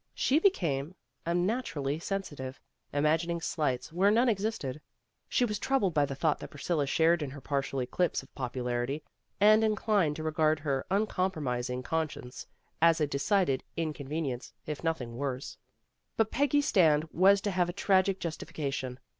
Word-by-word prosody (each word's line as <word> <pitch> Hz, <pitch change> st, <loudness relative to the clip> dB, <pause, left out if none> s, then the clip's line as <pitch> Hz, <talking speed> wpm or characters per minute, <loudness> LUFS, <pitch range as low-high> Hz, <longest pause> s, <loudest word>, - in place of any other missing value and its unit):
She 280 Hz, +4 st, +3 dB
became 170 Hz, -, +1 dB, 0.3 s
unnaturally 170 Hz, -, -1 dB
sensitive, 150 Hz, -9 st, -4 dB, 0.3 s
imagining 160 Hz, +4 st, +1 dB
slights 150 Hz, -3 st, -2 dB
where 190 Hz, +4 st, +4 dB
none 235 Hz, +4 st, +4 dB
existed. 195 Hz, -, -2 dB, 0.5 s
She 250 Hz, -, +2 dB
was 210 Hz, -3 st, -3 dB
troubled 235 Hz, -10 st, +1 dB
by 145 Hz, -2 st, +3 dB
the 135 Hz, -, -5 dB
thought 150 Hz, +2 st, +1 dB
that -, -, -7 dB
Priscilla 145 Hz, 0 st, -1 dB
shared 165 Hz, +3 st, +3 dB
in 145 Hz, -, -2 dB
her 140 Hz, +2 st, -9 dB
partial 135 Hz, 0 st, -2 dB
eclipse 160 Hz, +5 st, 0 dB
of 135 Hz, -, -20 dB
popularity, 125 Hz, +2 st, -2 dB, 0.4 s
and 215 Hz, +2 st, +6 dB
inclined 210 Hz, -7 st, +2 dB
to 155 Hz, -, -5 dB
regard 155 Hz, 0 st, +2 dB
her 140 Hz, -3 st, -1 dB
uncom 190 Hz, -1 st, +1 dB
promising 125 Hz, -4 st, -3 dB
conscience 155 Hz, -5 st, -3 dB, 0.3 s
as 165 Hz, 0 st, +5 dB
a 150 Hz, -, +3 dB
decided 145 Hz, 0 st, +1 dB
inconven 155 Hz, -1 st, -2 dB
ience, 125 Hz, -2 st, -5 dB
if 150 Hz, 0 st, -5 dB
nothing 125 Hz, -8 st, -2 dB
worse. 135 Hz, -1 st, -3 dB, 0.6 s
But 225 Hz, -1 st, +2 dB
Peggy's 285 Hz, +1 st, +2 dB
stand 155 Hz, -6 st, +4 dB
was 195 Hz, +3 st, +5 dB
to 205 Hz, -, -1 dB
have 180 Hz, -2 st, +1 dB
a -, -, 0 dB
tragic 190 Hz, 0 st, +2 dB
justification. 145 Hz, -6 st, -4 dB
160 Hz, 155 wpm, -30 LUFS, 140-190 Hz, 0.6 s, and